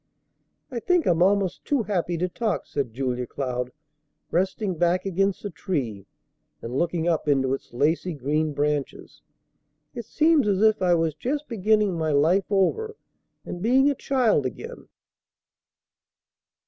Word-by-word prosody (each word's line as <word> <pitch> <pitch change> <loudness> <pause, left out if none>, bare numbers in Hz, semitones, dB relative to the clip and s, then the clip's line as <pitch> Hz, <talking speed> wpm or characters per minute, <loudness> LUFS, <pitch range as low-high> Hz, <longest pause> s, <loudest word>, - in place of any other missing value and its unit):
"I 245 - -3
think 355 +6 +1
I'm 170 -1 +2
almost 195 0 +2
too 280 -5 0
happy 175 -4 -1
to 180 +2 0
talk," 215 +4 -2
said 135 -5 -3
Julia 125 0 -2
Cloud, 125 -2 -3 0.6
resting 190 +3 0
back 175 +2 +2
against 195 +1 0
the 205 - -4
tree 135 - -4 0.5
and 115 +2 -6
looking 170 +2 0
up 165 -3 0
into 135 -2 +2
its 135 - -6
lacy 155 +7 0
green 150 +3 -1
branches. 145 -1 -3 0.7
"It 235 - -6
seems 310 -3 +3
as 200 0 +2
if 215 -2 +4
I 180 -1 +4
was 165 -2 0
just 290 - -3
beginning 210 -4 +1
my 160 -1 0
life 170 +7 +3
over 325 - +1 0.5
and 175 - -6
being 265 +6 +4
a - - 0
child 250 - +1
again." 125 - -9
180 Hz, 145 wpm, -25 LUFS, 145-215 Hz, 0.7 s, if